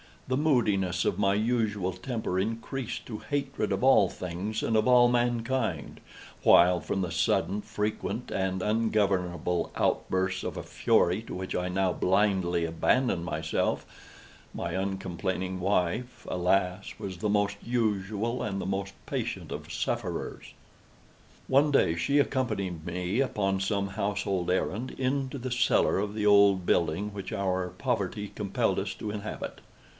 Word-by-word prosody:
The 130 - 0
moodiness 105 - +2
of - - 0
my 100 0 +3
usual 105 -4 0
temper 95 0 -3
increased 115 +5 -3
to 110 -3 -5
hatred 140 -2 -2
of - - -2
all 130 -8 +6
things 95 +5 -4
and 110 - +2
of 110 - +2
all 125 -1 +6
mankind; 120 - 0 0.4
while, 90 0 +6
from 85 +4 -2
the 90 -2 -2
sudden, 95 +4 +1
frequent, 110 +3 -3
and 95 -1 -1
ungovernable 100 -5 0
outbursts 95 0 0
of - - -4
a - - -4
fury 90 +5 +2
to - - -7
which 95 0 -4
I 90 0 -1
now 95 0 +1
blindly 95 -3 +2
abandoned 85 +3 +1
myself, 80 -1 -1 0.7
my - - -3
uncomplaining 95 -1 -2
wife, 95 +6 -1
alas, 90 +1 0
was 95 -2 -6
the 105 +3 -1
most 100 -1 +1
usual 110 0 -1
and 100 -4 -2
the - - -4
most 100 +1 -2
patient - - -3
of - - -6
sufferers. - - -3 0.9
One 140 +3 +4
day 85 -11 +3
she 140 - +2
accompanied 100 - -1
me, 90 +5 -1
upon 100 -7 +1
some 100 0 0
household 100 -2 -1
errand, 100 +6 -1
into 135 +1 -1
the 130 0 -5
cellar 120 - +3
of 105 +1 -2
the 105 -1 -1
old 100 -3 +5
building 90 +6 +1
which 100 -2 -6
our 95 -2 0
poverty 105 0 -2
compelled 100 -2 0
us - - -3
to 105 - -5
inhabit. 105 0 -5
100 Hz, 140 wpm, -28 LUFS, 90-115 Hz, 0.9 s, all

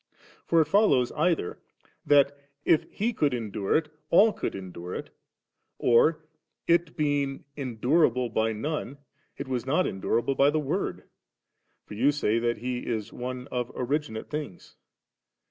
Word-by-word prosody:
for 165 - +4
it - - -14
ibiloin 160 - +4
either 160 - 0 0.5
that, 140 -1 +5 0.3
if 155 - +2
He 230 +4 -1
could 145 - +1
endure 105 -4 -2
it, 155 -1 -4 0.2
all 210 +5 +6
could - - -4
endure 90 -2 -7
it, - - -6 0.7
or, 155 +7 +3 0.4
it 170 -1 +2
being 145 -3 0
endurable 125 0 +1
by 110 0 0
none, 140 +4 -4 0.4
it 140 - -5
was 125 -2 -2
not 155 +7 +2
endurable 115 +7 0
by 135 +1 +4
the 155 +1 +1
Word, 145 - -2 0.8
for - - -10
you 125 +7 +3
say 115 -6 +1
that 120 0 0
He 125 +2 -3
is 110 -4 -4
one 125 +1 -5
of 125 -1 -2
originate 130 -3 -3
things. 150 - -6
135 Hz, 145 wpm, -27 LUFS, 115-150 Hz, 0.8 s, all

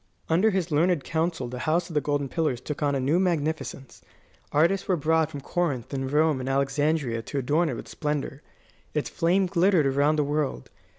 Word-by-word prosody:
Under 180 +7 +4
his 185 -4 -1
learned 165 0 +2
counsel 165 -4 -1
the 125 +1 -6
House 170 +2 +1
of 170 - -9
the 150 - +2
Golden 145 -1 -1
Pillars 150 -4 -1
took 150 +4 -6
on 145 -1 +1
a - - 0
new 145 +7 +2
magnificence. 160 -6 -2 0.5
Artists 170 +6 +2
were 185 - +3
brought 160 +1 +2
from 145 -3 -7
Corinth 140 -6 -2
and 135 -1 -2
Rome 150 -1 +3
and 130 +1 -4
Alexandria 140 -2 0
to 140 - -6
adorn 150 +6 +1
it 130 - -3
with - - -8
splendour. 150 -2 -3 0.5
Its 150 - -1
fame 180 +3 +2
glittered 180 -2 +3
around 140 +3 +2
the 150 - +2
world. 145 - -2
150 Hz, 190 wpm, -26 LUFS, 140-165 Hz, 0.5 s, Under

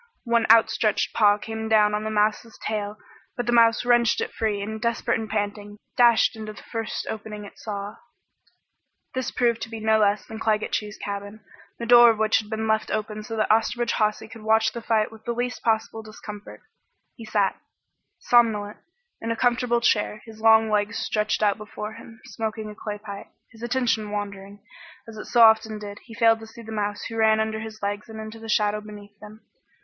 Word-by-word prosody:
One 235 -2 +2
outstretched 220 -1 +3
paw 205 -1 +4
came 220 +1 -5
down 210 -1 +4
on 210 0 -1
the 215 - -2
mouse's 215 +2 0
tail, 210 -1 -3 0.4
but 245 - -2
the 240 - 0
mouse 230 0 +4
wrenched 240 -1 +3
it - - -3
free 215 -2 -1
and 215 +2 -5
desperate 235 0 0
and 220 -1 -6
panting, 205 0 -3 0.2
dashed 235 -2 +4
into 215 -1 -7
the - - -13
first 225 -1 -4
opening 210 -1 -6
it 200 - -14
saw. 205 -1 -6 1.2
This 260 -1 -2
proved 235 -2 0
to 225 - -5
be 225 -1 -6
no 220 0 +3
less 205 -1 +2
than 220 0 -8
Claggett 215 -1 0
Chew's 210 0 -3
cabin, 205 +1 -6 0.4
the 235 - -5
door 240 0 +8
of 225 - +1
which 215 0 +3
had 210 -1 -8
been 220 0 -2
left 220 0 +1
open 215 0 -3
so 225 +1 -6
that 215 -1 +1
Osterbridge 230 +2 +1
Hawsey 215 0 0
could 225 0 -12
watch 220 0 +3
the 235 - -6
fight 220 -1 +1
with 220 -1 -14
the 240 - -1
least 245 +1 -3
possible 225 0 0
discomfort. 210 -1 -10 0.5
He 230 - -12
sat, 210 -3 0 0.6
somnolent, 215 -4 +2 0.4
in 230 - -4
a 230 - 0
comfortable 240 0 +1
chair, 210 -2 +1
his 220 -1 -13
long 220 0 +5
legs 210 +1 0
stretched 215 0 -1
out 205 0 +2
before 210 0 -7
him, 225 0 -13
smoking 220 -2 -5
a - - -9
clay 210 -1 -5
pipe. 205 -1 -9 0.2
His 225 -2 -16
attention 240 -3 0
wandering, 200 -1 -6 0.4
as 225 -1 -10
it - - -7
so 240 - +2
often 220 -1 +5
did, 205 -1 -8
he 225 - -12
failed 225 -1 +4
to 225 - -10
see 230 +1 -12
the 220 - -9
mouse 205 -1 -3
who 225 - -6
ran 220 -1 +4
under 220 0 -1
his 220 -1 -9
legs 205 +2 -3
into 220 0 -8
the 225 0 -9
shadow 210 0 +1
beneath 205 -1 -12
them. 215 +1 -13
220 Hz, 200 wpm, -24 LUFS, 210-225 Hz, 1.2 s, door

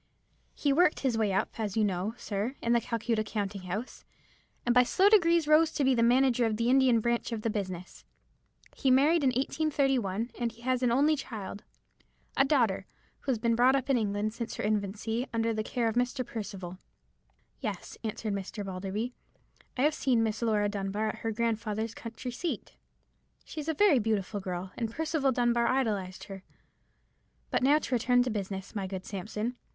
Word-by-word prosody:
He 285 -2 +1
worked 340 +1 +3
his 260 -4 +1
way 220 -3 +1
up, 195 - -1
as 210 -2 -2
you 220 - +4
know, 200 +2 -1
sir, 210 +6 -3
in 235 - +1
the 235 - +3
Calcutta 230 -1 -1
counting 205 -2 -3
house, 190 +7 -5 0.6
and 240 - +3
by 250 - +7
slow 380 +10 +4
degrees 340 -6 +4
rose 310 +1 +5
to 290 - 0
be 265 0 +4
manager 245 +1 +3
of 215 -1 -1
the 235 +2 +2
Indian 260 -4 +4
branch 235 +1 0
of 220 -2 -4
the 225 - 0
business. 185 -4 -5 0.7
He 270 - +1
married 290 +5 +4
in - - +4
1831, 260 -5 0
and 235 -1 0
he 235 0 -17
has 255 0 +1
an 245 -2 +2
only 290 +5 +4
child, 215 -7 -7 0.7
a - - +5
daughter, 235 -10 +1 0.3
who 275 - -2
has 245 - +1
been 230 +1 +1
brought 250 +3 +5
up 275 0 0
in 265 - +4
England 210 0 -1
since 230 0 -5
her - - -4
infancy, 215 +4 -1
under 230 0 0
the 215 - -1
care 235 +2 -1
of 225 - 0
Mr. 245 +2 0
Percival." 190 -5 -6 0.8
"Yes," 210 -8 -5
answered 215 -1 -3
Mr. 200 +1 -5
Balderby, 195 +6 -4 0.6
"I 255 - +2
have 300 +1 +4
seen 250 -6 +2
Miss 220 0 -2
Laura 215 -3 +2
Dunbar 205 +1 -2
at - - -4
her 225 - -2
grandfather's 225 -1 -1
country 235 +2 -7
seat. 330 +8 -4 0.7
She - - -7
is 305 +1 -4
a 320 - 0
very 325 -6 +5
beautiful 210 -2 -1
girl, 185 -1 -5
and 230 -2 -2
Percival 310 +1 0
Dunbar 240 -1 +2
idolized 210 -8 -1
her. 195 -1 -8 1.1
But - - +1
now 280 +4 +5
to 305 - -4
return 245 +1 +3
to 250 - -2
business, 195 -2 -4
my 200 -3 -3
good 185 -1 -6
Sampson. 215 +5 -4
230 Hz, 185 wpm, -29 LUFS, 205-260 Hz, 1.1 s, by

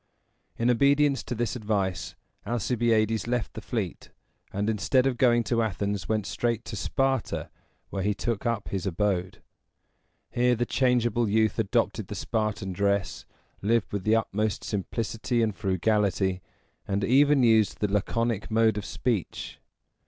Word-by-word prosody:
In 120 +1 +3
obedience 140 +2 +3
to 120 - -3
this 120 +1 -1
advice, 100 -5 -2 0.3
Alcibiades 115 -1 +1
left 120 -3 -1
the - - -7
fleet, - - -4 0.4
and, 100 +2 -2
instead 110 +4 +2
of 135 -2 +1
going 120 -1 +3
to 115 0 +1
Athens, 100 -2 -2
went 110 -2 0
straight 115 +1 -1
to 110 - -6
Sparta, 135 +4 -1 0.4
where 100 - -2
he 105 +2 0
took 115 -1 -2
up 115 -3 -2
his 95 -1 -3
abode. 95 0 -1 0.9
Here 125 0 +2
the 120 +1 0
changeable 120 -3 +1
youth 110 +1 +2
adopted 105 -3 0
the - - -6
Spartan 110 -3 -2
dress, 100 0 -1 0.3
lived 115 +1 +1
with 100 -2 -2
the 110 +2 +3
utmost 110 -1 -1
simplicity 115 +3 -2
and 110 -3 -1
frugality, 95 -1 +1 0.5
and 100 +1 -1
even 140 +4 +4
used 110 -3 +3
the 105 - +1
laconic 110 +1 -1
mode 110 -1 +3
of 105 - -7
speech. 115 -8 -3
110 Hz, 145 wpm, -27 LUFS, 100-120 Hz, 0.9 s, even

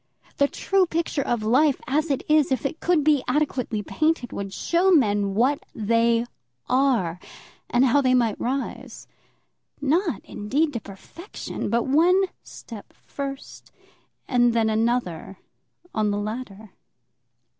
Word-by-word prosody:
The 280 - +4
true 385 +4 +1
picture 325 -3 -1
of 240 -4 -1
life 265 +6 +3
as 300 +4 0
it 275 - -1
is, 305 -2 +3
if 265 - -1
it 295 +4 -3
could 340 -4 +2
be 295 -3 +3
adequately 255 -7 -1
painted, 310 - -1
would 200 -1 -5
show 345 - +1
men 205 - +2
what 260 +6 +2
they 230 +2 +2 0.4
are, 250 -10 +1 0.5
and 245 +2 +3
how 270 +3 +4
they 255 -1 +3
might 230 -4 +1
rise, 265 +3 -4 0.7
not, 310 - 0
indeed, 285 +9 -1
to 235 - -2
perfection, 220 - -8
but 235 0 +1
one 335 +7 +4 0.2
step 225 -4 -11
first, 275 -1 -8 0.6
and 240 -2 +3
then 225 -1 +2
another, 220 -5 -1 0.6
on 215 -1 +1
the 205 - -1
ladder. 215 -1 -6
255 Hz, 135 wpm, -24 LUFS, 220-295 Hz, 0.7 s, The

